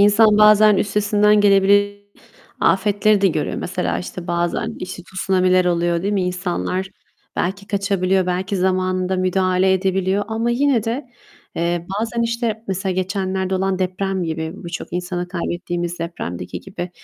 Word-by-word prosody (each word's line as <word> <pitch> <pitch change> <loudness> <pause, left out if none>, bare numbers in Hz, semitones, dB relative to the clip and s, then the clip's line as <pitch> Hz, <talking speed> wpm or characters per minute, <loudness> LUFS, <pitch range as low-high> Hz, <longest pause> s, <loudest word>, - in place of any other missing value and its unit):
İnsan 210 +1 +5
bazen 210 0 +6
üstesinden 210 +1 +2
gelebile 205 0 +4 0.6
afetleri 205 +3 +3
de 195 - +4
göremez. 170 - -2
Mesela 85 0 -2
işte 170 - -7
bazen 175 +6 -1
işte 185 0 -6
tsunamiler 185 0 +1
oluyor, 170 -1 +1
değil 200 +2 -1
mi? 195 -2 +1
İnsanlar 180 +1 -2 0.5
belki 195 +2 -2
kaçabiliyor, 195 -2 0
belki 185 +2 -1
zamanında 185 0 0
müdahale 185 0 +2
edebiliyor 190 +1 0
ama 225 +1 -1
yine 250 -2 +2
de, 240 +5 -2 0.5
eee, 170 0 -1
bazen 230 +1 -1
işte 230 -1 -2
mesela 190 0 -1
geçenlerde 190 0 -2
olan 190 0 0
deprem 190 +1 -1
gibi, 160 -1 -3
birçok 170 -1 -7
insanı 180 0 -3
kaybettiğimiz 175 -1 -3
depremdeki 90 - -5
gibi 180 -2 -7
190 Hz, 135 wpm, -20 LUFS, 180-205 Hz, 0.6 s, bazen